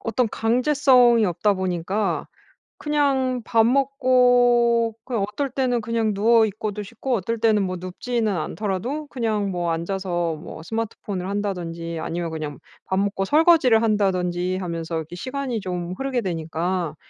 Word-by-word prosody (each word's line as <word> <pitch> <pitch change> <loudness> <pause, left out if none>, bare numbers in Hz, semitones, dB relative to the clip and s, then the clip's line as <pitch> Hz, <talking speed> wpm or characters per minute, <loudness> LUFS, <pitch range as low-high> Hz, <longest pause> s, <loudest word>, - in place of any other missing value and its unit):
어떤 230 +1 0
강제성이 245 0 +4
없다 200 +3 +1
보니까 190 +2 -1 0.5
그냥 275 -4 0
밥 225 -2 +3
먹고 245 -3 +3
그냥 235 -5 -2
어떨 275 +5 -2
때는 255 -2 0
그냥 230 -1 0
누워있고도 215 -1 +2
싶고 235 +5 -3
어떨 230 +3 -2
때는 215 -2 +3
뭐 185 -1 -3
눕지는 215 +5 -2
않더라도 210 - -3
그냥 215 -6 -1
뭐 175 -2 -1
앉아서 175 -1 -2
뭐 155 +1 -9
스마트폰을 205 -2 -4
한다든지 170 -5 -3
아니면 165 0 -3
그냥 150 -4 -5 0.2
밥 190 0 -1
먹고 200 -1 0
설거지를 295 - +5
한다든지 185 -4 0
하면서 170 -2 -4
이렇게 160 +2 -6
시간이 255 +1 -3
좀 180 -1 -4
흐르게 270 -2 -1
되니까 170 -3 -2
210 Hz, 320 characters per minute, -23 LUFS, 180-245 Hz, 0.5 s, 설거지를